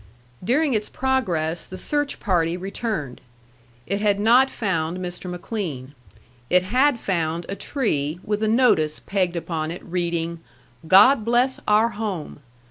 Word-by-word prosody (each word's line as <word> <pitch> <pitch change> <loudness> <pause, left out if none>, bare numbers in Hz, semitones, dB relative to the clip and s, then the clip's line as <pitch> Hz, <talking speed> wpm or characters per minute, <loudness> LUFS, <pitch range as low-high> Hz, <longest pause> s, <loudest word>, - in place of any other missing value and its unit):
During 275 - +2
its 215 -1 -1
progress 180 -12 -1
the 185 - -8
search 290 +8 -2
party 175 -4 0
returned. 190 - -4 0.6
It 200 +6 -2
had 205 -1 +2
not 245 +5 +5
found 175 -7 -2
Mr. 180 0 -6
McLean. 175 - -5 0.6
It 180 0 +4
had 255 +6 +2
found 170 -3 -2
a 195 - -4
tree 165 - -2
with 210 0 -2
a 220 - +1
notice 215 -10 +3
pegged 185 -3 -1
upon 160 -2 -3
it, 170 - -7
reading, 170 -1 -2 0.5
"God 210 +8 +7
bless 245 +3 +2
our 215 +2 +4
home!" 205 -9 -5
190 Hz, 135 wpm, -23 LUFS, 170-230 Hz, 0.6 s, God